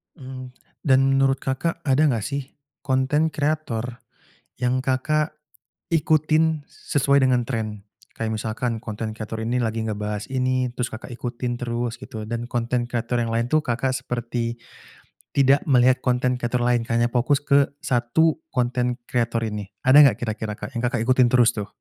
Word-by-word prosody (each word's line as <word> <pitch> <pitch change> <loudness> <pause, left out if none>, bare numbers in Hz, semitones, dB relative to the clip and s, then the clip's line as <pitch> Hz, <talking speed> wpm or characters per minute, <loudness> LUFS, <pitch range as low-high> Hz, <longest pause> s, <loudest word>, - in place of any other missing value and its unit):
Mmm, 130 -1 -9 0.3
dan 130 -2 +5
menurut 135 0 +2
Kakak, 165 +6 -2
ada 140 0 +2
nggak 115 -6 +1
sih 140 +2 -4 0.3
konten 140 +4 +1
kreator 125 -6 -2 0.6
yang 125 +1 0
Kakak 150 +4 0 0.5
ikutin 155 -1 +2
sesuai 140 -1 +1
dengan 125 -2 +2
tren? 110 -4 -4 0.3
Kayak 110 -1 -2
misalkan 115 +1 -3
konten 110 -1 -4
kreator 110 0 -5
ini 125 +2 0
lagi 115 -1 -1
ngebahas 105 -1 -3
ini 130 -1 0
terus 125 -1 -2
Kakak 120 +3 -8
ikutin 120 0 -3
terus 120 -1 -3
gitu, 110 -4 -7
dan 120 +1 -3
konten 120 +1 0
kreator 120 0 -1
yang 115 - -3
lain 115 +1 0
tuh 155 +4 +2
Kakak 130 +1 -1
seperti 120 -2 -3 0.8
tidak 140 +1 +4
melihat 130 -2 +4
konten 125 0 +1
kreator 120 0 -1
lain 120 -1 +2
kayaknya 120 +1 +2
fokus 130 +4 +2
ke 140 -1 +4 0.2
1 145 +4 +2
konten 125 -1 0
kreator 115 -1 0
ini, 105 -2 -4 0.2
ada 130 +3 +7
nggak 135 - +3
kira-kira, 110 -2 -3
Kak, - - -7
yang 120 - -3
Kakak 120 -2 0
ikutin 130 +1 +4
terus 120 -1 +4
tuh? 105 -2 -5
125 Hz, 155 wpm, -23 LUFS, 115-135 Hz, 0.8 s, ada